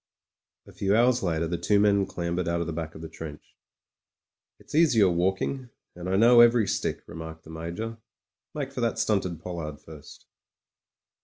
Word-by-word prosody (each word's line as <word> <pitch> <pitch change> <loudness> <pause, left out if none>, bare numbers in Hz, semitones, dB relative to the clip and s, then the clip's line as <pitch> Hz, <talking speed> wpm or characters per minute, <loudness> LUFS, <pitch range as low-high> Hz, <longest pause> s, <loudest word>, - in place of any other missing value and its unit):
A - - -14
few 100 +1 +1
hours 125 +2 +3
later 85 -4 0
the 85 +1 -3
two 100 +4 +2
men 100 -1 +3
clambered 85 0 -3
out 85 0 0
of 85 - -1
the 85 - -4
back 80 0 -5
of 80 - -9
the - - -5
trench. 80 -2 -10 1.0
"It's - - -16
easier 145 - +5
walking, 95 +9 -1 0.3
and 90 +1 -6
I 95 - +1
know 120 +3 +7
every 120 -3 +5
stick," - - -2
remarked 80 0 -9
the 80 - -12
Major. 85 +8 -5 0.6
"Make 140 -3 -3
for 125 - -5
that 115 -1 0
stunted 100 -7 0
pollard 80 -4 -6
first." 75 -2 -13
90 Hz, 170 wpm, -27 LUFS, 80-115 Hz, 1.0 s, know